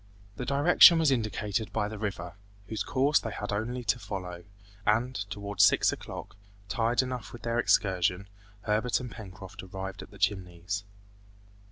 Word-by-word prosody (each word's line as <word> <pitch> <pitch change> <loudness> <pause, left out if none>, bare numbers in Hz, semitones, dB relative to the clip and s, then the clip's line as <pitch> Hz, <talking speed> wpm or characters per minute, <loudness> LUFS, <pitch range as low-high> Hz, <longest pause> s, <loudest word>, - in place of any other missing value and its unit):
The 125 - -5
direction 160 +5 +7
was 160 -3 +3
indicated 110 -2 -1
by 105 -2 0
the 105 0 -7
river, 95 -5 -4 0.3
whose 110 +1 -4
course 140 +2 +2
they 110 - -5
had 105 -1 -4
only 120 +4 -2
to 120 - +1
follow, 90 -5 -6 0.4
and, 115 +5 +2 0.2
towards 100 0 0
six - - +5
o'clock, - - -8 0.3
tired 115 +3 +1
enough 125 -3 -5
with 120 - -11
their 115 0 0
excursion, 95 -3 +2 0.3
Herbert 110 +2 +1
and 125 -1 -7
Pencroft 95 -2 -10
arrived 95 +1 -7
at - - -11
the 100 - -14
Chimneys. 95 0 -2
105 Hz, 155 wpm, -29 LUFS, 95-120 Hz, 0.4 s, direction